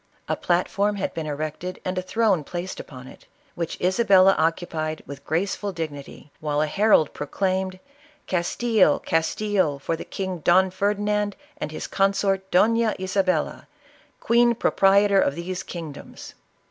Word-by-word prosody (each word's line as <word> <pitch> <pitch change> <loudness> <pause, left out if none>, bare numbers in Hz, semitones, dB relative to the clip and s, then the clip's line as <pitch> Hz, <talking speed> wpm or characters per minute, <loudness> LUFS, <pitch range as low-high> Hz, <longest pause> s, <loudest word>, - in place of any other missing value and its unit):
A - - 0
platform 200 +4 0
had 195 - -3
been 160 -2 -4
erected 155 +5 -4
and 185 - -2
a 185 - -1
throne 195 -3 +1
placed 175 +5 -6
upon 130 -2 -10
it, - - -15 0.3
which 170 -2 -4
Isabella 190 0 +5
occupied 160 -1 -1
with 140 0 -9
graceful 195 +5 -2
dignity, 150 -4 -7
while 150 -1 -1
a 155 - +3
herald 195 -1 +3
proclaimed, 185 +4 -2 0.5
"Castile, 185 0 +2
Castile 165 -1 0
for 155 +4 -2
the - - -7
King 190 -2 -4
Don 185 +4 +4
Ferdinand 205 +1 0 0.2
and 155 - -4
his 155 - -5
consort 195 -1 0
Dofla 225 +4 +3
Isa 190 +1 0
bella, 185 -1 -1 0.5
queen 235 0 +3
proprietor 200 -2 +4
of 140 - +1
these 180 +2 -4
kingdoms 165 -5 -9
185 Hz, 140 wpm, -24 LUFS, 160-200 Hz, 0.5 s, Isabella